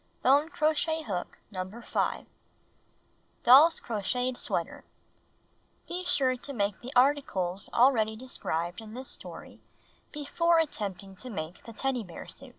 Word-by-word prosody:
Bone 285 +5 +5
crochet 315 -1 +1
hook 190 -8 -4
No. 190 - -6 0.2
5. - - -15 0.3
W - - -25 1.2
Doll's 295 +7 +8
Crocheted 245 +3 -1
Sweater - - -2 1.0
(Be 360 +1 -4
sure 265 -7 +2
to 280 +3 -5
make 200 -4 -1
the 250 - -7
articles 225 -9 +2
already 230 -3 +4
described 175 -7 -3
in 220 0 -10
this 260 +1 -5
story - - -8 0.5
before 335 +3 +1
attempting 200 - -2
to 255 - -6
make 165 -5 -6
the 230 - -9
Teddy 265 +1 -1
Bear 175 -4 -9
Outfit.) 270 0 -11
250 Hz, 135 wpm, -29 LUFS, 205-285 Hz, 1.2 s, Doll's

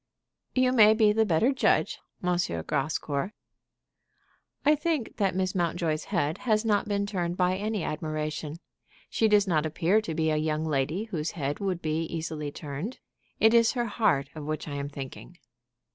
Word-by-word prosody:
"You 255 -1 +4
may 220 -3 +7
be 215 -2 +5
the 220 0 +2
better 185 +9 +3
judge, 265 - +1 0.2
M. 180 0 +2 0.3
Grascour." 145 +4 -1 1.3
"I 300 - +6
think 300 -4 -1
that 195 -4 +1
Miss 185 0 0
Mountjoy's 170 -3 -1
head 160 -6 -1
has 220 -2 +1
not 210 -1 +2
been 200 -1 0
turned 180 -4 -2
by 180 0 +2
any 210 -1 -2
admiration. 155 0 -3 0.5
She 225 - +3
does 210 -1 +4
not 155 -4 +2
appear 170 +6 +2
to 165 -7 -5
be 160 0 +1
a 155 - +1
young 155 0 -1
lady 155 +6 0
whose 170 -8 -3
head 145 -1 -2
would 185 -4 -2
easily 160 -1 -2
be - - -4
turned. 150 - -6 0.4
It 220 +1 +5
is 230 -1 +5
her 240 -2 0
heart 195 -11 +1
of 155 - -7
which 155 +1 -3
I 145 - -5
am 140 0 -3
thinking." 140 +5 -9
175 Hz, 170 wpm, -28 LUFS, 155-215 Hz, 1.3 s, may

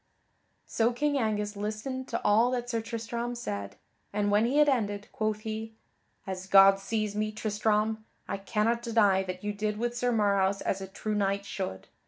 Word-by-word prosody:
So 230 +1 +1
King 285 +4 0
Angus 210 -2 -1
listened 215 +6 -4
to - - -2
all 220 +4 +5
that 245 -1 -2
Sir 230 -1 0
Tristram 235 +1 -4
said, 100 - -5 0.4
and 205 0 0
when 210 +2 +4
he 270 +4 0
had 300 0 +6
ended, 205 -6 0
quoth 215 -1 -1
he: 220 0 -5 0.5
"As 190 -1 -5
God 195 0 +7
sees 215 0 -2
me, 215 0 -1
Tristram, 215 0 0 0.2
I 200 - -2
cannot 220 +3 0
deny 215 -5 +3
that 185 0 -6
you 210 0 -2
did 210 +1 -2
with 240 +2 -2
Sir 245 0 +1
Marhaus 200 -3 +2
as 195 - -1
a 190 - -5
true 210 +2 -4
knight 200 -1 0
should. 190 - -5
215 Hz, 180 wpm, -29 LUFS, 200-230 Hz, 0.5 s, God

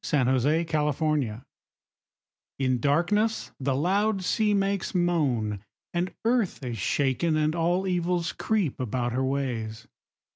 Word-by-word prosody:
The 140 +3 +2
Charm 150 -6 0 1.1
In 130 -2 +1
darkness 175 - +1
the 135 -1 0
loud 195 +6 +1
sea 210 +3 +1
makes 195 -1 -1
moan; 140 - +1 0.3
And 175 +1 -1
earth 230 - +1
is 120 -3 -4
shaken, 145 - +1
and 155 0 +1
all 175 +3 +1
evils 175 -2 0
creep 205 - -1
About 120 0 -1
her 130 +2 0
ways. 120 -5 -2
155 Hz, 115 wpm, -27 LUFS, 130-180 Hz, 1.1 s, The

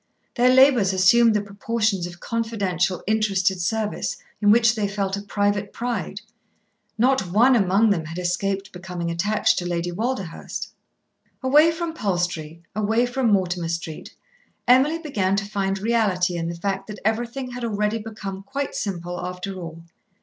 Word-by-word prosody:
Their 245 0 +4
labours 255 -7 +5
assumed 215 +5 +5
the 210 - +1
proportions 205 -2 -1
of 175 0 -11
confidential 200 -6 -1
interested 195 -3 +1
service, 210 +3 -2 0.2
in 205 - +4
which 230 +2 +5
they 215 -3 -1
felt 200 -1 -2
a 200 - -5
private 205 0 -1
pride. 220 -5 -4 0.8
Not 245 -4 +2
one 245 +7 +5
among 205 +1 +3
them 165 -5 0
had 160 +2 -7
escaped 195 +3 -2
becoming 180 -2 -5
attached 205 +6 +1
to 175 - -5
Lady 175 0 -2
Walderhurst. 205 -3 -4 0.7
Away 295 +5 +6
from 330 0 -4
Palstrey, 175 - -2
away 220 +3 +2
from 245 -2 0
Mortimer 180 -4 +1
Street, 165 -2 -5 0.5
Emily 265 +6 +5
began 210 - -1
to 200 0 -1
find 195 -1 -1
reality 195 -5 +1
in 165 -1 -2
the 170 - -4
fact 195 +2 -3
that 210 -1 -7
everything 240 +4 -1
had 245 0 -6
already 210 0 0
become 210 -3 -7
quite 275 +6 -4
simple, 175 -3 -4
after 180 +2 -5
all. 165 -3 -8
200 Hz, 150 wpm, -23 LUFS, 180-230 Hz, 0.8 s, Away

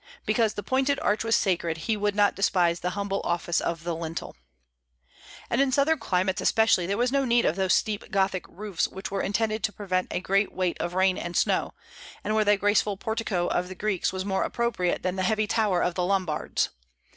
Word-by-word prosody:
"Because 225 -3 +1
the 205 - -4
pointed 265 +5 +1
arch 210 +1 +1
was 225 0 +2
sacred, 170 -4 0
he 225 - +1
would 205 -1 -1
not 205 -1 +3
despise 175 -3 +2
the 180 - -2
humble 200 -1 -1
office 175 0 0
of 165 -1 -3
the 170 -1 -2
lintel." 165 0 -5 1.1
And 235 - +1
in 275 -1 +2
southern 285 +4 +2
climates 185 0 0
especially 220 -6 +3
there 200 +1 -1
was 245 +1 +1
no 275 0 +2
need 240 -2 +3
of 160 - +2
those 190 -1 +2
steep 210 -2 -2
Gothic 190 -1 0
roofs 200 -1 -2
which 190 +1 -7
were 195 - -1
intended 215 +2 -1
to 215 - +1
prevent 185 -3 -2
a - - -2
great 195 +2 +1
weight 185 -2 -2
of 175 +1 -3
rain 185 0 +2
and 175 0 -4
snow, - - +1 0.5
and 215 - -1
where 215 0 +3
the 205 0 +4
graceful 205 0 +1
portico 220 -5 -2
of 175 0 -1
the 185 - -8
Greeks 200 -2 -1
was 185 0 -4
more 190 -1 0
appropriate 235 -7 -1
than 185 +1 -1
the - - 0
heavy 215 +3 +1
tower 205 -4 +1
of 180 - 0
the 180 - -1
Lombards. 180 -5 0
195 Hz, 210 wpm, -26 LUFS, 180-215 Hz, 1.1 s, the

